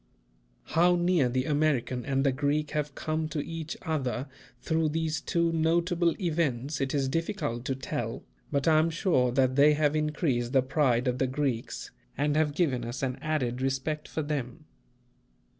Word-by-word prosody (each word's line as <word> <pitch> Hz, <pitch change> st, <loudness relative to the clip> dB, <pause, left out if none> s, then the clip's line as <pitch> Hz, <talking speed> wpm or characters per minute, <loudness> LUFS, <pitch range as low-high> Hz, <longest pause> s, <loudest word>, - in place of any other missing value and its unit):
How 175 Hz, +2 st, +5 dB
near 175 Hz, -6 st, +2 dB
the 130 Hz, +1 st, 0 dB
American 145 Hz, -5 st, +1 dB
and 135 Hz, -1 st, +1 dB
the 135 Hz, -, +4 dB
Greek 145 Hz, +3 st, 0 dB
have 150 Hz, -2 st, -2 dB
come 155 Hz, 0 st, -2 dB
to 150 Hz, -2 st, -3 dB
each 165 Hz, -2 st, -5 dB
other 135 Hz, -4 st, -2 dB, 0.3 s
through 160 Hz, +4 st, 0 dB
these 155 Hz, 0 st, -1 dB
two 170 Hz, -2 st, +1 dB
notable 170 Hz, +1 st, +1 dB
events, 150 Hz, -, -1 dB
it 135 Hz, +1 st, -1 dB
is 135 Hz, -2 st, +1 dB
difficult 150 Hz, -, -2 dB
to 135 Hz, -, -1 dB
tell; 130 Hz, 0 st, -4 dB, 0.3 s
but 140 Hz, +1 st, 0 dB
I 155 Hz, -1 st, +6 dB
am 160 Hz, +1 st, +2 dB
sure 160 Hz, -, +2 dB
that 130 Hz, -1 st, +2 dB
they 145 Hz, +2 st, +6 dB
have 150 Hz, 0 st, +2 dB
increased 150 Hz, -5 st, 0 dB
the 130 Hz, -2 st, +4 dB
pride 130 Hz, -2 st, +1 dB
of 125 Hz, 0 st, 0 dB
the 130 Hz, -, +2 dB
Greeks, 130 Hz, -3 st, -3 dB, 0.3 s
and 145 Hz, +2 st, +1 dB
have 150 Hz, -2 st, +1 dB
given 140 Hz, -8 st, +1 dB
us 120 Hz, +3 st, -5 dB
an 130 Hz, -1 st, -2 dB
added 130 Hz, -5 st, -1 dB
respect 135 Hz, +3 st, -2 dB
for 155 Hz, -, -3 dB
them. 145 Hz, 0 st, -4 dB
145 Hz, 170 wpm, -28 LUFS, 130-160 Hz, 0.3 s, I